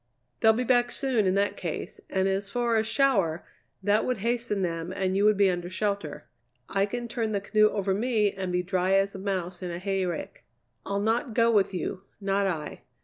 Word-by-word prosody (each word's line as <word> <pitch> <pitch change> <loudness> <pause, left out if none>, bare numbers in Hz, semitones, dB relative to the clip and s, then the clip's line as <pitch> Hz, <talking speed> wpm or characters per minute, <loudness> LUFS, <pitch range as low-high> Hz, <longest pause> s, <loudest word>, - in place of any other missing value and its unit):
"They'll 220 -1 +6
be 245 +3 -1
back 245 -1 +3
soon 250 -7 +1
in 185 - +2
that 200 +1 +1
case, - - -5
and 190 0 +1
as 195 +1 -1
for 240 +1 0
a 220 - +3
shower, 220 - +1 0.4
that 205 +2 +3
would 250 - -1
hasten 230 -2 -1
them 165 0 -3
and 185 0 -1
you 200 +1 +3
would 210 -1 +4
be 200 -1 +5
under 175 0 -4
shelter. 200 -4 -3 0.4
I 195 +1 +1
can 240 +3 -4
turn 230 -2 -2
the 200 - +1
canoe 215 +1 +4
over 195 -2 -1
me 215 -1 +1
and 190 -2 -4
be 180 0 0
dry 185 +1 +1
as 195 0 +2
a 195 - -7
mouse 185 -2 -3
in 180 - -4
a 170 - -4
hayrick. 185 -2 -3 0.4
I'll 200 0 -1
not 225 +2 0
go 230 -1 +4
with 205 -3 +3
you, 185 +1 -4 0.2
not 195 0 +1
I. 155 -5 -4
200 Hz, 205 wpm, -27 LUFS, 185-220 Hz, 0.4 s, They'll